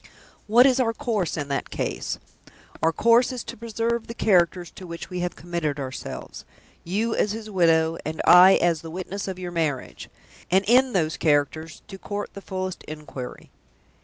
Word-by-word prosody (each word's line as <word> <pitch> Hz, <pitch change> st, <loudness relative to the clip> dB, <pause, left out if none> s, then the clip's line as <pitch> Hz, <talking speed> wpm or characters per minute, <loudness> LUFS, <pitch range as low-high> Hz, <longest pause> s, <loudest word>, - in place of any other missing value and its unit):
What 235 Hz, +4 st, +6 dB
is 265 Hz, -1 st, +4 dB
our 230 Hz, -3 st, +2 dB
course 225 Hz, -, -2 dB
in 145 Hz, -2 st, -3 dB
that 140 Hz, -, -2 dB
case? -, -, -3 dB, 0.6 s
Our 165 Hz, -, +3 dB
course 235 Hz, +8 st, +4 dB
is 250 Hz, -3 st, -5 dB
to -, -, -8 dB
preserve 230 Hz, +1 st, -2 dB
the 230 Hz, -, -7 dB
characters 180 Hz, -5 st, +2 dB
to 185 Hz, -, -11 dB
which 170 Hz, +2 st, -8 dB
we 180 Hz, -, -3 dB
have 175 Hz, 0 st, -2 dB
committed 165 Hz, -4 st, -3 dB
ourselves 130 Hz, -1 st, -7 dB, 0.4 s
you 215 Hz, +6 st, -1 dB
as 210 Hz, -, +1 dB
his 220 Hz, -1 st, -7 dB
widow, 165 Hz, -3 st, +3 dB
and 155 Hz, +1 st, -5 dB
I 180 Hz, +2 st, +9 dB
as 170 Hz, -3 st, +1 dB
the 165 Hz, -, -8 dB
witness 185 Hz, +4 st, -5 dB
of 190 Hz, -1 st, -4 dB
your 180 Hz, -1 st, -6 dB
marriage 155 Hz, -6 st, -3 dB, 0.4 s
and, 190 Hz, +2 st, +3 dB
in 255 Hz, +3 st, +4 dB
those 160 Hz, -4 st, 0 dB
characters, 155 Hz, +1 st, 0 dB
to 195 Hz, -, -10 dB
court 205 Hz, +1 st, -5 dB
the 200 Hz, -, -9 dB
fullest 185 Hz, -1 st, -5 dB
inquiry. 150 Hz, -5 st, -8 dB
180 Hz, 175 wpm, -24 LUFS, 160-220 Hz, 0.6 s, I